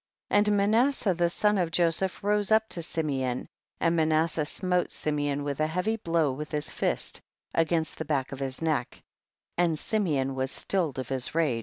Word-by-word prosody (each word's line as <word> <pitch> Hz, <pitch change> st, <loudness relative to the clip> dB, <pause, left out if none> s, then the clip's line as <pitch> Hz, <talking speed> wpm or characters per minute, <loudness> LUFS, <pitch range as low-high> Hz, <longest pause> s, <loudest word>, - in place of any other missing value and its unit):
42. 205 Hz, +1 st, +4 dB
And 205 Hz, -, +3 dB
Manasseh 220 Hz, +1 st, +3 dB
the 170 Hz, 0 st, +1 dB
son 210 Hz, +3 st, +2 dB
of 175 Hz, -2 st, +1 dB
Joseph 175 Hz, +3 st, 0 dB
rose 205 Hz, 0 st, +2 dB
up 220 Hz, 0 st, +4 dB
to 170 Hz, -, -3 dB
Simeon, 135 Hz, -7 st, -2 dB, 0.3 s
and 170 Hz, 0 st, +2 dB
Manas 160 Hz, 0 st, +3 dB
seh 155 Hz, -1 st, 0 dB
smote 180 Hz, +2 st, 0 dB
Simeon 145 Hz, -1 st, -1 dB
a 145 Hz, +2 st, 0 dB
heavy 180 Hz, +7 st, 0 dB
blow 165 Hz, -7 st, +1 dB
with 150 Hz, +4 st, -6 dB
his 150 Hz, 0 st, -2 dB
fist -, -, -1 dB, 0.3 s
against 165 Hz, -1 st, 0 dB
the 160 Hz, -, -3 dB
back 140 Hz, -3 st, -1 dB
of 135 Hz, -, -6 dB
his 135 Hz, +2 st, -3 dB
neck, 155 Hz, -7 st, -1 dB, 0.6 s
and 170 Hz, -3 st, +2 dB
Simeon 150 Hz, -11 st, 0 dB
was 130 Hz, 0 st, -1 dB
stilled 170 Hz, -9 st, -1 dB
of 130 Hz, -2 st, -4 dB
his 130 Hz, +2 st, 0 dB
rage. 150 Hz, -8 st, +2 dB
160 Hz, 180 wpm, -28 LUFS, 145-185 Hz, 0.6 s, 42